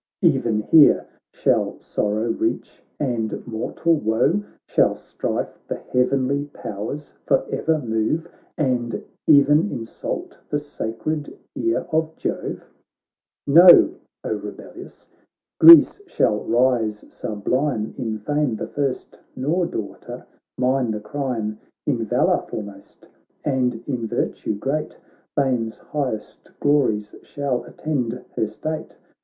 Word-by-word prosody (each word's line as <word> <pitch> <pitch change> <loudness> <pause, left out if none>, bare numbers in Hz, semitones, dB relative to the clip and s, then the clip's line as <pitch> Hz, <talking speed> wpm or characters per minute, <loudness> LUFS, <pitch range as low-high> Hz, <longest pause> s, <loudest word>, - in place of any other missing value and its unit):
E'en 110 -2 +3
here 150 +6 +6 0.3
shall - - 0
sorrow 110 +2 -1
reach - - -3 0.2
and 120 -6 -2
mortal 120 +8 -1
woe? 125 - +2 0.3
Shall - - +3
strife - - -4
the - - -2
heavenly 135 +2 0
powers 140 +1 -7
for - - +3
ever 160 -1 +1
move, 120 +5 -1 0.3
And 125 -5 -1 0.3
e'en 150 +5 +6
insult 115 -1 -5
the 145 - 0
sacred 145 +1 -4 0.2
ear 345 0 0
of 160 0 0
Jove - - -4 0.8
1 140 - -1
Know, 175 +1 +9 0.3
O - - -1
rebellious, - - -9 0.5
Greece 335 +4 +9
shall 105 - +1
rise 115 -3 +1
sublime, 110 +2 -2
In 110 -3 -3
fame 145 +3 0
the - - -4
first, 140 -3 -3 0.2
nor, 165 +7 0
daughter, 105 - -7 0.3
mine 125 -1 +1
the 105 -1 -2
crime, 110 -2 -3 0.3
In 125 -6 0
valour - - +2
foremost, 100 -2 -9 0.4
and 125 -4 0
in 125 -5 -2
virtue 110 - -2
great: 135 +8 -3 0.4
Fame's 125 -5 0
highest 130 -8 -5
glories 125 -8 +1
shall 140 -3 -3
attend 125 -6 -3 0.2
her 110 - 0
state. 155 +9 -6
130 Hz, 115 wpm, -22 LUFS, 110-145 Hz, 0.8 s, Know